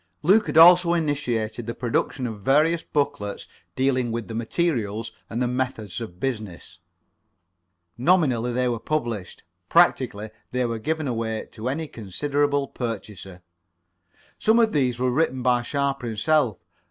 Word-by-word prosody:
Luke 205 +6 +4
had - - -1
also 175 +1 +8
initiated 120 -8 -2
the 115 - -4
production 125 +1 -1
of 110 -4 -5
various 155 +8 +3
booklets 105 -9 -2 0.3
dealing 130 -2 +1
with 115 -1 -4
the 115 - -7
materials 115 - -1 0.2
and 115 - -3
the 125 - +1
methods 125 -5 -3
of 90 -6 -8
business. 110 -8 -5 1.2
Nominally 130 -6 +2
they 125 +1 0
were 120 -2 -1
published; 120 - -3 0.3
practically 105 +1 +2 0.2
they 125 0 -1
were 115 -1 -3
given 155 +4 -2
away 115 -2 -3
to 110 +3 -4
any 155 +4 -3
considerable 145 +6 -1
purchaser. 100 -7 -6 1.0
Some 220 +1 +3
of 225 -2 +4
these 130 -5 +1
were 125 0 +1
written 130 -2 0
by 125 -1 +3
Sharper 140 0 -2
himself. 115 +2 +1
125 Hz, 140 wpm, -24 LUFS, 115-145 Hz, 1.2 s, also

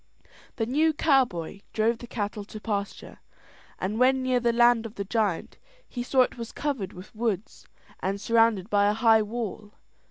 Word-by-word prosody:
The 225 - -1
new 305 +7 +2
cowboy 250 - +1
drove 225 +1 +1
the 240 - -9
cattle 210 -3 -4
to 215 - -9
pasture, 205 -2 -4 0.6
and 210 +4 -3
when 260 +1 +4
near 255 -1 +2
the 240 -1 +2
land 240 -1 +4
of 215 - -15
the 200 - -3
giant, 205 -4 -1 0.3
he 245 - -5
saw 255 +2 +3
it 250 - 0
was 230 -1 -6
covered 265 -11 -3
with 180 +2 -12
woods 220 -3 -3 0.3
and 195 +2 -2
surrounded 225 -3 +2
by 205 -2 +3
a - - +2
high 225 -1 +5
wall. 215 -1 -5
225 Hz, 170 wpm, -26 LUFS, 205-245 Hz, 0.6 s, high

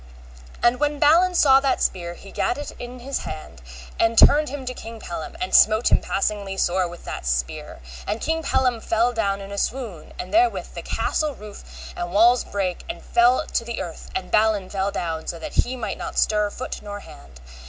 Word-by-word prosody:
And 240 +1 +4
when 295 0 +1
Balin 340 +6 +4
saw 270 -5 +6
that 275 -1 +1
spear, 175 -2 -1
he 195 - -13
gat - - 0
it 290 0 -6
in 245 0 -8
his 275 +2 -3
hand 75 -6 -8 0.4
and 225 0 +2
turned 300 +1 +6
him 275 -1 -6
to 255 - -3
King 225 -2 -9
Pellam, 170 -5 -6
and 185 - -3
smote 215 +2 +5
him - - +5
passingly 200 -1 -2
sore 180 0 +1
with 175 0 -11
that - - -5
spear, - - -3 0.3
that 215 - -1
King 325 +4 -1
Pellam 250 -6 +1
fell 230 +3 +1
down 200 -3 -1
in 195 0 -9
a 200 - -3
swoon, 225 -12 -4
and 180 - -7
therewith 355 +2 +2
the - - -6
castle 305 -3 -1
roof 210 -2 -11
and 175 0 -4
walls 235 +4 +5
brake 190 -3 -3
and 335 - -6
fell 240 +2 +3
to - - -1
the 235 0 -5
earth, - - -7
and 375 - -3
Balin 215 -3 +2
fell 195 0 0
down 165 -4 -4
so 170 - -3
that 165 - -7
he 255 - +1
might 235 -3 -4
not - - -6
stir 210 -1 +2
foot 250 - -6
nor 205 -1 -7
hand. 70 - -14
220 Hz, 205 wpm, -23 LUFS, 190-255 Hz, 0.4 s, saw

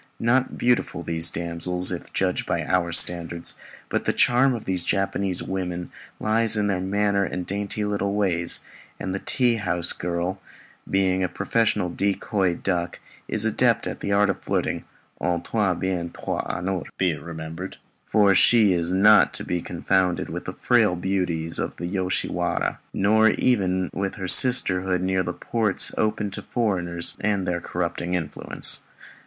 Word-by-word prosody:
Not 125 +3 +1
beautiful 125 0 0
these 85 0 +4
damsels, 85 +2 +1
if 90 - -6
judged - - -1
by - - -1
our 85 -2 0
standard, 85 0 +3 0.4
but - - -2
the - - +1
charm 125 +2 +3
of 115 - -7
Japanese 95 0 -1
women 90 -2 -4 0.3
lies 110 0 +2
in 105 - +1
their 100 -3 0
manner 100 +1 0
and 90 -1 -4
dainty 100 +2 -2
little 100 -1 -2
ways, 85 -5 +2 0.4
and 95 - -4
the 95 - -3
tea 120 0 +1
house 85 -4 0
girl, 90 +2 -3 0.5
being 95 -1 +1
a 90 - -1
professional 105 -5 0
decoy 100 -1 0
duck, 85 -2 -2 0.3
is - - +1
an - - 0
adept - - +2
in - - -3
the 100 - -3
art 100 0 +3
of - - -8
flirting, - - -2 0.4
en 90 -1 +1
tout 100 -6 0
bien 90 -3 -2
tout - - -4
honneur, 90 +2 -2 0.2
be 95 -2 +2
it 75 -3 -6
remembered; 80 +3 -7 0.3
for 105 -3 +3
she 110 -1 +5
is 85 0 0
not 105 +3 +5
to - - -2
be 90 -1 -2
confounded 90 0 -1
with - - -6
the - - -5
frail 90 - +2
beauties 90 -3 -1
of - - -3
the 85 - -5
Yoshiwara, 90 -1 -2
nor 110 +3 +3
even 95 -7 +1
with 95 +1 -3
her 95 -2 -5
sisterhood 95 -7 +5
near 95 0 +1
the 90 -1 -3
ports 110 +1 +2
open 105 -1 -1
to - - -5
foreigners, 90 -7 -2
and 100 -2 0
to - - -1
their 85 -1 -3
corrupting 85 0 -3
influence. 80 -4 -4
95 Hz, 160 wpm, -23 LUFS, 85-100 Hz, 0.5 s, she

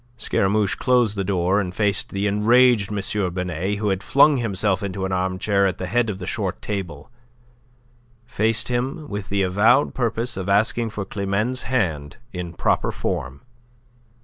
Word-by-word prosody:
Scaramouche 105 -2 +1
closed 125 -5 +2
the 100 - -1
door 95 0 +1
and 90 -2 -5
faced 105 -2 0
the 100 +1 -2
enraged 110 +1 +4
M. 100 -2 -1
Binet, 90 +2 -2
who 105 0 -1
had 95 -1 -1
flung 140 +6 +4
himself 100 -3 0
into 95 -1 -3
an 95 - -3
armchair 95 +2 +1
at 95 - -3
the 95 - -4
head 120 +4 +1
of 100 - -3
the 90 - -7
short 95 -2 -3
table, 90 - -6 1.1
faced 110 0 0
him 130 +5 -2
with 100 -1 -5
the 100 -1 +1
avowed 110 +9 +3
purpose 120 -2 -2
of 95 0 -4
asking 110 +3 +2
for 105 -2 -5
Climene's 105 +6 -1
hand 80 - -1 0.2
in 90 -2 -5
proper - - 0
form. 70 +2 -4
100 Hz, 160 wpm, -22 LUFS, 95-115 Hz, 1.1 s, enraged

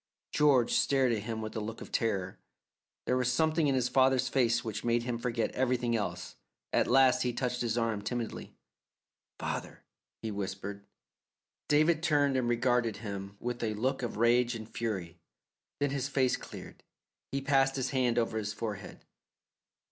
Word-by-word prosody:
George 140 -5 +4
stared 135 -3 +3
at 110 -3 0
him 110 0 -4
with 110 - -6
a - - -1
look 110 +1 -5
of - - -6
horror. 95 -5 -1 0.7
There 125 - +1
was 125 -1 +1
something 155 +4 +2
in 135 - +2
his 125 -2 +2
father's 130 0 +3
face 120 -3 +2
which 105 -2 -4
made 120 0 +1
him 120 -1 -3
forget 120 -1 -1
everything 125 -2 +1
else. 110 - -4 0.4
At - - +3
last 130 0 +5
he 125 - +1
touched 125 0 -2
his 120 -1 0
arm 115 -3 0
timidly. 120 +2 -4 0.8
"Father," - - -5 0.4
he 110 - -2
whispered. 100 0 -5 0.8
David 155 +2 +3
turned 145 -4 +2
and 125 -2 +1
regarded 120 -1 +1
him 100 -2 -6
with 120 0 -4
a 110 -2 -1
look 130 +5 -1
of 120 -4 -4
rage 120 +1 +3
and 110 -1 -7
fury, 95 -8 -4 0.6
then 145 -1 +1
his 140 -1 -1
face 135 -3 +2
cleared; - - -10 0.5
he 140 - 0
passed 135 -1 +2
his 130 -1 -1
hand 125 -3 +1
over 115 -2 +1
his 105 -1 -3
forehead. 105 -3 -6
120 Hz, 165 wpm, -31 LUFS, 110-130 Hz, 0.8 s, last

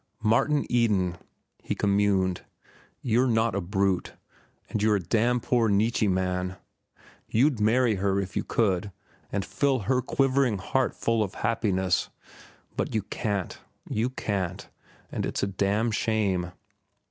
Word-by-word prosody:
"Martin 140 +7 +2
Eden," 105 -7 +2 0.5
he - - -3
communed. 100 -2 +1 0.6
"You're 125 +2 +2
not 115 -1 +2
a 100 - -1
brute, 95 0 0 0.5
and 105 - -3
you're 105 0 +3
a - - +1
damn 115 +6 +1
poor 120 -1 +1
Nietzscheman. 95 -4 +1 0.7
You'd 125 +1 +2
marry 115 +2 +3
her 100 +1 +1
if 95 -1 -4
you - - 0
could 100 -3 0 0.4
and 100 -1 -1
fill 135 -4 +1
her 125 +5 +1
quivering 130 -3 +1
heart 125 +7 0
full 115 -1 0
with 105 -2 -1
happiness. 95 -5 0 0.7
But - - -2
you 110 - +1
can't, 100 -2 -3 0.3
you 115 +4 0
can't. 95 -7 -3 0.4
And - - -2
it's - - -2
a - - +2
damn 100 +4 0
shame." 100 -5 0
105 Hz, 135 wpm, -27 LUFS, 95-115 Hz, 0.7 s, you're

